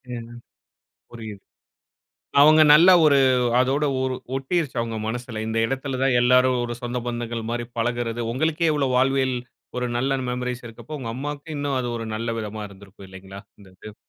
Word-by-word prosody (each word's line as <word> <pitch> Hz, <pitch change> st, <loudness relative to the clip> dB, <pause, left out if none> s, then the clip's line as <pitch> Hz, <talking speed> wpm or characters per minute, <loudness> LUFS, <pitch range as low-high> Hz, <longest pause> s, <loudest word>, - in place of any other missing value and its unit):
ஏன்னா, 115 Hz, 0 st, -8 dB, 0.8 s
புரியுது. 110 Hz, -4 st, -9 dB, 1.0 s
அவுங்க 155 Hz, +2 st, +7 dB
நல்லா 170 Hz, +5 st, +7 dB
ஒரு 140 Hz, -2 st, +5 dB, 0.4 s
அதோட 135 Hz, +4 st, +1 dB, 0.2 s
ஒரு 130 Hz, -1 st, -1 dB, 0.2 s
ஒட்டிருச்சு 140 Hz, +2 st, -2 dB
அவுங்க 115 Hz, -1 st, -4 dB
மனசுல. 120 Hz, -1 st, -5 dB
இந்த 110 Hz, 0 st, -2 dB
இடத்தில 135 Hz, +1 st, -3 dB
தான் 135 Hz, -2 st, +2 dB
எல்லாரும் 125 Hz, +1 st, +4 dB
ஒரு 120 Hz, -, -4 dB
சொந்த 120 Hz, 0 st, -3 dB
பந்தங்கள் 120 Hz, -1 st, -4 dB
மாரி 120 Hz, 0 st, -3 dB
பழகுறது 120 Hz, 0 st, -2 dB
உங்களுக்கே 160 Hz, +4 st, +1 dB
இவ்ளோ 140 Hz, -3 st, 0 dB
வாழ்வில் 130 Hz, 0 st, +2 dB, 0.4 s
ஒரு 125 Hz, -, -1 dB
நல்ல 135 Hz, +2 st, 0 dB
மெமரீஸ் 125 Hz, 0 st, -4 dB
இருக்கப்போ, 115 Hz, +7 st, -11 dB
உங்க 115 Hz, -, -5 dB
அம்மாவுக்கு 145 Hz, +4 st, -6 dB
இன்னும் 145 Hz, -2 st, -1 dB
அது 125 Hz, -, -3 dB
ஒரு 115 Hz, -, -5 dB
நல்ல 115 Hz, +2 st, -3 dB
விதமா 110 Hz, 0 st, -6 dB
இருந்திருக்கும். 100 Hz, 0 st, -15 dB
இல்லைங்களா? 95 Hz, +1 st, -11 dB, 0.2 s
இந்த 95 Hz, -, -16 dB
இது. 105 Hz, -1 st, -11 dB
125 Hz, 160 wpm, -23 LUFS, 115-135 Hz, 1.0 s, அவுங்க